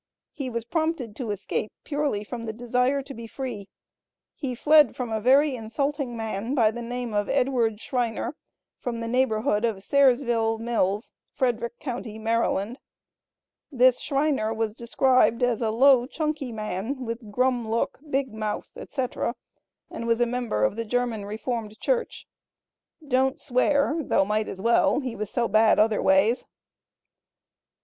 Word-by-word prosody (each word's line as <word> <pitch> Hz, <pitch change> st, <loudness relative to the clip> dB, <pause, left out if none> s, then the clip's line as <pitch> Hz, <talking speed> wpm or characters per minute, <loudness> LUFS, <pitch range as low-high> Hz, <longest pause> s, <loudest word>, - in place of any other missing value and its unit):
He 270 Hz, -3 st, -5 dB
was 235 Hz, -1 st, -4 dB
prompted 315 Hz, -7 st, -2 dB
to 245 Hz, -5 st, -4 dB
escape 205 Hz, +1 st, -3 dB
purely 285 Hz, -8 st, -1 dB
from 230 Hz, +1 st, -6 dB
the 220 Hz, -, -3 dB
desire 250 Hz, +4 st, 0 dB
to 275 Hz, -, -9 dB
be 230 Hz, -2 st, -8 dB
"free." 230 Hz, -5 st, -6 dB, 0.7 s
He 260 Hz, -4 st, -4 dB
fled 300 Hz, +4 st, +5 dB
from 245 Hz, -3 st, -4 dB
a 220 Hz, -1 st, -1 dB
"very 270 Hz, +4 st, +4 dB
insulting 255 Hz, +2 st, -2 dB
man," 225 Hz, +3 st, -3 dB
by 225 Hz, -5 st, +4 dB
the 240 Hz, +2 st, -6 dB
name 245 Hz, -1 st, -4 dB
of 205 Hz, -1 st, 0 dB
Edward 240 Hz, -5 st, +1 dB
Schriner, 240 Hz, +1 st, -2 dB, 0.5 s
from 235 Hz, -2 st, -4 dB
the 230 Hz, -, -4 dB
neighborhood 225 Hz, -3 st, +1 dB
of 215 Hz, -5 st, -1 dB
Sairsville 240 Hz, -5 st, +3 dB
Mills, 220 Hz, -2 st, -1 dB, 0.2 s
Frederick 235 Hz, -3 st, -1 dB
Co., 250 Hz, -4 st, -3 dB
Md. 225 Hz, 0 st, -1 dB, 0.9 s
This 255 Hz, -2 st, +4 dB
Schriner 275 Hz, -6 st, 0 dB
was 225 Hz, -1 st, -1 dB
described 245 Hz, 0 st, +2 dB
as 245 Hz, -2 st, +1 dB
a 225 Hz, -, +1 dB
"low 250 Hz, +2 st, +5 dB
chunky 300 Hz, -3 st, -3 dB
man, 220 Hz, +4 st, -4 dB
with 230 Hz, -2 st, -6 dB
grum 250 Hz, 0 st, +1 dB
look, 230 Hz, +1 st, -1 dB
big 265 Hz, -3 st, -1 dB
mouth, 215 Hz, -1 st, -4 dB
etc.," 255 Hz, -3 st, -3 dB, 0.6 s
and 230 Hz, -, -5 dB
was 230 Hz, 0 st, +2 dB
a 240 Hz, -, +4 dB
member 240 Hz, -, -1 dB
of 105 Hz, -, +2 dB
the 230 Hz, -, -1 dB
German 230 Hz, -2 st, -1 dB
Reformed 215 Hz, +1 st, -4 dB
Church. -, -, -1 dB, 0.8 s
"Don't 265 Hz, 0 st, +2 dB
swear, 285 Hz, +3 st, +2 dB
though 225 Hz, -, +2 dB
might 215 Hz, +1 st, 0 dB
as 190 Hz, -, -6 dB
well; 230 Hz, +7 st, +3 dB
he 255 Hz, -5 st, -4 dB
was 210 Hz, -1 st, -4 dB
so 235 Hz, +1 st, 0 dB
bad 220 Hz, +1 st, +4 dB
other 215 Hz, 0 st, +3 dB
ways." 195 Hz, +6 st, +3 dB
235 Hz, 150 wpm, -25 LUFS, 220-260 Hz, 0.9 s, fled